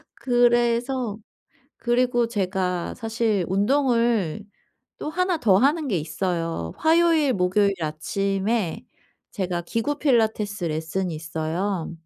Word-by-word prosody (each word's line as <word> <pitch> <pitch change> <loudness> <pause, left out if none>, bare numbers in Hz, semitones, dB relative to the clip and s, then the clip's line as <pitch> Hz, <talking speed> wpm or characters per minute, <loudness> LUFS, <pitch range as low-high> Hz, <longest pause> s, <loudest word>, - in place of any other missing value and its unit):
그래서 240 -1 +1 0.6
그리고 240 -1 +1
제가 185 -5 -2
사실 225 -4 -1
운동을 230 - +1 0.5
또 - - -4
하나 365 +2 0
더 195 -8 +4
하는 290 +6 +2
게 205 -8 0
있어요. 165 - -3
화요일 320 -3 +3
목요일 200 +1 +2
아침에 195 +5 -1 0.5
제가 180 -4 -2
기구 230 +10 -2
필라테스 220 - +1
레슨이 160 +3 -2
있어요. 160 +3 -3
210 Hz, 230 characters per minute, -24 LUFS, 180-245 Hz, 0.6 s, 더